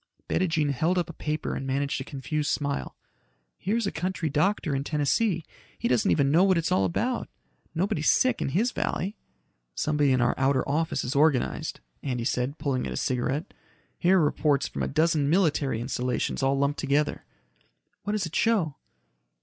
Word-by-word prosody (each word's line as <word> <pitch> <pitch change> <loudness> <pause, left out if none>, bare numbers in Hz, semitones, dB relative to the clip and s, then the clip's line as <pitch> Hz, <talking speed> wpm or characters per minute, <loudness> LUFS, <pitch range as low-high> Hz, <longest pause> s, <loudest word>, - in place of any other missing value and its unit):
Bettijean 160 -5 +1
held 160 +7 +1
up 175 -1 -1
a - - -15
paper 155 0 -3
and 135 - -4
managed 140 +1 -1
a - - -3
confused 145 +2 -3
smile. 140 -1 -2 0.6
"Here's 225 +4 -1
a 200 - -1
country 175 -1 -2
doctor 155 +1 +1
in 135 0 -1
Tennessee. 160 +5 +1 0.3
He - - -1
doesn't 120 -2 +2
even 140 -2 +3
know 170 +5 +5
what 190 -2 +4
it's 165 -1 -1
all 95 - +3
about. 90 - -1 0.5
Nobody's 160 -3 +1
sick 240 +2 +3
in - - 0
his 220 - +1
valley." 195 +4 -2 0.6
"Somebody 150 -2 +2
in 130 - +3
our 120 0 +3
outer 135 -1 +2
office 155 +3 0
is 125 +3 -3
organized," 140 -3 +1 0.2
Andy 125 -4 -2
said, 130 +2 -1
pulling 135 -3 -1
at - - -5
his - - -2
cigarette. 130 +5 -1 0.5
"Here're 185 +2 +4
reports 145 -2 +2
from - - -5
a - - 0
dozen 155 -1 +2
military 150 -8 +2
installations 125 +2 -2
all 135 +1 +2
lumped 140 +1 0
together." 145 +1 0 0.8
"What 205 - -3
does 210 -3 0
it 165 - -7
show?" 195 -11 +2
150 Hz, 175 wpm, -27 LUFS, 135-170 Hz, 0.8 s, know